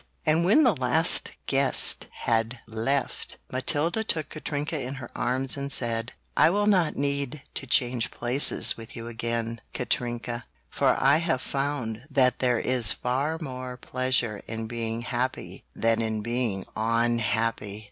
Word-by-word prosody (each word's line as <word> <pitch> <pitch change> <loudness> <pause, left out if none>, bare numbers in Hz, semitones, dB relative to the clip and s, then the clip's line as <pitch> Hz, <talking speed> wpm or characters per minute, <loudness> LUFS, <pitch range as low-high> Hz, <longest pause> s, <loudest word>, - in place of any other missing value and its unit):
And 160 +2 +3
when 215 - +5
the 245 -7 +4
last 130 +6 +4
guest 135 -1 +3 0.2
had 115 +2 0
left, 115 +5 -2
Matilda 150 +10 +1
took 160 -8 -2
Katrinka 150 0 -3
in 130 +2 -5
her 130 -3 -9
arms 130 +3 0
and 140 0 -3
said, 115 -1 +1 0.2
"I - - +5
will 205 +4 +1
not 185 -7 +2
need 140 0 -2
to 135 - -5
change 125 -1 +2
places 125 +4 +3
with 115 -1 -11
you 115 0 -7
again, 115 0 -3
Katrinka, 120 -2 -2 0.3
for - - +2
I 135 +3 +5
have 160 -6 -1
found 135 -6 -3
that 130 -3 +2
there 125 -2 +2
is 125 -5 +2
far 140 +6 -2
more 130 -4 -6
pleasure 125 -4 0
in 115 0 -4
being 115 0 -4
happy 125 +1 -4
than 115 0 +1
in 110 -1 -2
being 115 -4 -2
unhappy!" 115 -2 0
125 Hz, 145 wpm, -26 LUFS, 115-140 Hz, 0.3 s, when